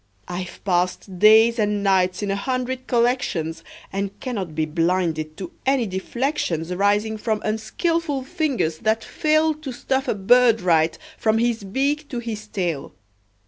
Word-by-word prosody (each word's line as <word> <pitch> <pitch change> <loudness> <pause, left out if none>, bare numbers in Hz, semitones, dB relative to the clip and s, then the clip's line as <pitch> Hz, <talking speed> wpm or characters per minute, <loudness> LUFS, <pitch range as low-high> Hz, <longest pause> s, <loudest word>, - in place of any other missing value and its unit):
I've 180 0 -6
passed 180 0 -1
days 220 +3 +6
and 210 -1 +1
nights 185 -1 +2
in 200 - -1
a - - 0
hundred 255 +4 -3
collections, 235 -10 0 0.3
And 195 0 -3
cannot 195 - -4
be 155 0 +1
blinded 165 -1 -1
to 185 -3 -6
any 265 -3 +2
deflections 190 - -2
Arising 205 +4 +1
from 215 0 -1
unskilful 290 +6 -1
fingers 270 - -1
that 220 +1 +1
fail 310 +4 +2
To 305 -3 -7
stuff 265 +2 -2
a - - +1
bird 230 +3 +5
right, 165 -2 +2 0.2
from 220 0 +2
his 230 -2 0
beak 280 +9 -1
to 250 - -4
his 220 -3 -5
tail. 175 -9 -3
215 Hz, 145 wpm, -22 LUFS, 180-255 Hz, 0.3 s, days